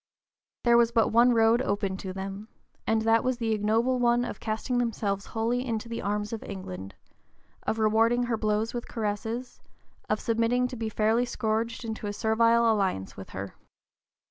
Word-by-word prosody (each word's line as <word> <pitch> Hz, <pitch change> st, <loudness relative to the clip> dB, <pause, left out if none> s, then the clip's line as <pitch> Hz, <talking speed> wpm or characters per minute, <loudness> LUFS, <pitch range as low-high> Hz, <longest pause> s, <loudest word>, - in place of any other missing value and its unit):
There 235 Hz, -1 st, +5 dB
was 235 Hz, -1 st, +4 dB
but 225 Hz, -2 st, +3 dB
one 235 Hz, +3 st, +5 dB
road 225 Hz, +2 st, +4 dB
open 200 Hz, -5 st, -1 dB
to 190 Hz, -1 st, -6 dB
them, 195 Hz, +2 st, -6 dB, 0.4 s
and 220 Hz, 0 st, +2 dB
that 225 Hz, 0 st, +3 dB
was 255 Hz, -1 st, 0 dB
the 230 Hz, -2 st, -1 dB
ignoble 225 Hz, +4 st, +1 dB
one 240 Hz, 0 st, +3 dB
of -, -, -6 dB
casting 225 Hz, +3 st, -1 dB
themselves 205 Hz, -4 st, -1 dB
wholly 230 Hz, +2 st, -1 dB
(p. -, -, -2 dB
048) 235 Hz, -, -2 dB
into 220 Hz, +1 st, -6 dB
the 230 Hz, -, -4 dB
arms 210 Hz, +2 st, -2 dB
of 225 Hz, -, -4 dB
England, 95 Hz, -, -7 dB, 0.7 s
of 220 Hz, -, 0 dB
rewarding 225 Hz, +2 st, +3 dB
her 240 Hz, -1 st, 0 dB
blows 215 Hz, 0 st, 0 dB
with 240 Hz, -1 st, -5 dB
caresses, 225 Hz, +3 st, -4 dB, 0.5 s
of 215 Hz, -, +1 dB
submitting 230 Hz, +2 st, +1 dB
to 255 Hz, -, -6 dB
be 225 Hz, -2 st, -3 dB
fairly 220 Hz, +3 st, +2 dB
scourged 230 Hz, 0 st, -2 dB
into 220 Hz, -1 st, -4 dB
a 205 Hz, -, -3 dB
servile 230 Hz, +1 st, +3 dB
alliance 190 Hz, -, -1 dB
with 95 Hz, -, -9 dB
her. 100 Hz, 0 st, -6 dB
225 Hz, 180 wpm, -27 LUFS, 210-235 Hz, 0.7 s, There